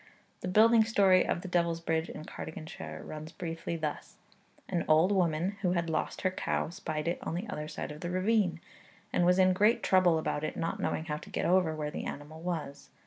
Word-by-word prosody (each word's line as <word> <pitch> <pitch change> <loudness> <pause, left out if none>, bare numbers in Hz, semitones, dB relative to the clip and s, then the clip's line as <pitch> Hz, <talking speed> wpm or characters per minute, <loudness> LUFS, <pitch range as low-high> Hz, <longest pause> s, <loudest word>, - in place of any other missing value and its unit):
The - - -5
building 220 +4 +6
story 200 -4 +4
of - - 0
the - - -5
Devil's 170 -2 +1
Bridge 165 0 -1
in 155 - -8
Cardiganshire 80 - -7
runs 155 +1 -7
briefly 165 -1 -4
thus: 155 -2 -4 0.5
An 175 -3 -1
old 160 +5 +5
woman 180 0 +1
who 180 -3 +2
had 170 -2 -1
lost - - -2
her 185 - +1
cow 185 - -1
spied 155 -2 -4
it 170 - 0
on - - -3
the 190 +6 -3
other 150 -6 -4
side 155 - -5
of 150 - -9
the 175 - -3
ravine, 185 -2 +1 0.5
and 175 - +3
was 180 0 +5
in 185 -1 +5
great 210 +5 +3
trouble 185 -3 +4
about 155 -1 -2
it, 155 - -3
not 165 - -2
knowing 160 - -1
how 150 -2 -2
to - - -11
get - - -2
over 180 -3 +3
where 150 -1 -3
the - - -5
animal 150 +3 -7
was. 160 -5 -4
170 Hz, 210 wpm, -30 LUFS, 155-185 Hz, 0.5 s, building